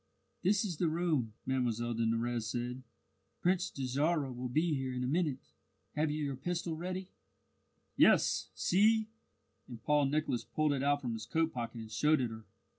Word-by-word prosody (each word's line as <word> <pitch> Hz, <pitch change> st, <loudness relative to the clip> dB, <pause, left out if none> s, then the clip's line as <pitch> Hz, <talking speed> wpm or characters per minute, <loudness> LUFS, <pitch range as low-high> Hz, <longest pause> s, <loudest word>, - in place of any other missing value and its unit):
"This 200 Hz, +3 st, +2 dB
is 175 Hz, -6 st, -3 dB
the 175 Hz, -, +1 dB
room," 155 Hz, -9 st, 0 dB
Mlle 120 Hz, -3 st, 0 dB
de 115 Hz, 0 st, 0 dB
Nurrez 115 Hz, 0 st, 0 dB
said. 125 Hz, +2 st, -3 dB, 0.6 s
"Prince 185 Hz, +1 st, +1 dB
Dajarah 140 Hz, +2 st, 0 dB
will 125 Hz, +1 st, -4 dB
be 155 Hz, +6 st, +1 dB
here 135 Hz, -2 st, -2 dB
in 125 Hz, -, -2 dB
a -, -, -1 dB
minute. 150 Hz, -2 st, -1 dB, 0.4 s
Have 155 Hz, +1 st, +1 dB
you 150 Hz, +1 st, -2 dB
your 140 Hz, -2 st, -2 dB
pistol 170 Hz, +4 st, -2 dB
ready?" 185 Hz, +3 st, -4 dB, 0.9 s
"Yes, -, -, +4 dB
see!" 220 Hz, +3 st, +3 dB, 0.6 s
and 120 Hz, -3 st, -9 dB
Paul 150 Hz, -1 st, +3 dB
Nicholas 140 Hz, -4 st, 0 dB
pulled 155 Hz, -1 st, 0 dB
it 135 Hz, -, -1 dB
out 145 Hz, +1 st, +2 dB
from 120 Hz, -4 st, -2 dB
his 110 Hz, 0 st, -6 dB
coat 160 Hz, +5 st, +1 dB
pocket 115 Hz, -1 st, -4 dB
and 110 Hz, -1 st, -9 dB
showed 150 Hz, +8 st, +3 dB
it 120 Hz, -3 st, -1 dB
her. 110 Hz, 0 st, -9 dB
140 Hz, 175 wpm, -33 LUFS, 120-165 Hz, 0.9 s, Yes